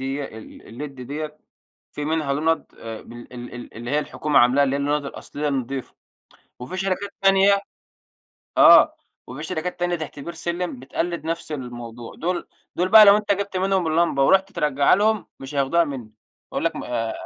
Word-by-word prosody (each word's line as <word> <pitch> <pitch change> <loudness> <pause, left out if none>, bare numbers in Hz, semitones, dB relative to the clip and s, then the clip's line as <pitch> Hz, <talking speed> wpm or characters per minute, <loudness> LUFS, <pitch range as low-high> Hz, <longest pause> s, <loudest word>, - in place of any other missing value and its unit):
ديّة، 135 +2 -3
ال 115 +2 -11
الled - - -10
ديّة، 150 +4 -6 0.5
في 150 - -5
منها 155 -2 0
لُنض 160 +3 0
آه 115 -1 -7
بال 120 +1 -12
ال 120 0 -8
ال 120 - -9
اللي 120 +2 -6
هي 150 - +2
الحكومة 150 0 +1
عاملاها، 125 +4 +5
اللي 135 - 0
هي 140 - -1
اللُنض 145 +1 0
الأصلية 145 +1 -5
النضيفة، 135 -1 -3 0.7
وفي 125 +10 -7
شركات 195 +1 -2
تانية 195 +1 +5 1.0
آه، - - +8 0.3
وفي 135 +4 -8
شركات 175 +3 -4
تانية 175 0 +1
تحت 155 -2 -7
بير 170 +4 -7
سلم 170 -3 -3
بتقلد 165 +5 -3
نفس 165 -1 -3
الموضوع. 120 -4 -7
دول 175 +2 -3 0.3
دول 180 +1 +1
بقى، 215 +2 +10
لو 200 0 +8
أنت 210 -1 +1
جِبت 200 -1 -3
منهم 190 -1 +1
اللمبة، 160 -3 +2
ورُحت 190 +6 +3
ترجعها 145 +3 +3
لهم، 215 0 +1
مش 135 +2 -8
هياخدوها 145 +5 +2
مني، 125 -7 -7 0.4
هيقول - - -2
لك: - - 0
"ما" 115 -2 -3
150 Hz, 175 wpm, -23 LUFS, 130-175 Hz, 1.0 s, بقى